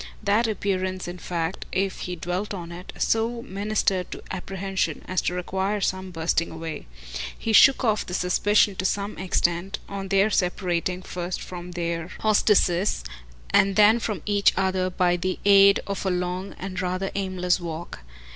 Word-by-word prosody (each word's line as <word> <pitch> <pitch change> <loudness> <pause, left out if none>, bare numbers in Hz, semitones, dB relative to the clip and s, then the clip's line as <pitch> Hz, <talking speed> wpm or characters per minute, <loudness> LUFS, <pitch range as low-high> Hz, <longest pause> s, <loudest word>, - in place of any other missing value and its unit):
That 210 +3 +3
appearance 185 -3 -2
in 175 +1 -6
fact, 170 +1 -3
if 195 0 -1
he 180 - -4
dwelt 180 +5 -3
on 170 -2 -7
it, 175 +2 -8
so 230 +1 0
ministered 195 -2 -1
to - - -8
apprehension 190 +1 -3
as 185 -1 0
to 180 - -1
require 190 +3 -1
some 190 -1 -2
brushing 165 0 0
away. 160 - -6 0.5
He 225 - -2
shook 270 +5 +7
off 215 -3 +1
the 180 - -3
suspicion 200 +3 +3
to - - -2
some 200 +2 -1
extent, 180 0 0
on 195 -1 -5
their 195 +3 +3
separating 180 -1 0
first 180 0 -4
from 180 0 -8
their 170 -1 -2
hostesses 205 - +3 0.5
and 195 0 +4
then 215 +2 +6
from 210 -8 -3
each 205 -1 +3
other, 185 -1 +1
by 180 -1 +1
the 185 +1 -2
aid 200 0 +7
of 200 -1 -4
a 190 - 0
long 180 +1 -2
and 190 -1 -4
rather 185 +1 -2
aimless 185 -2 0
walk. 170 - -6
185 Hz, 160 wpm, -25 LUFS, 180-200 Hz, 0.5 s, shook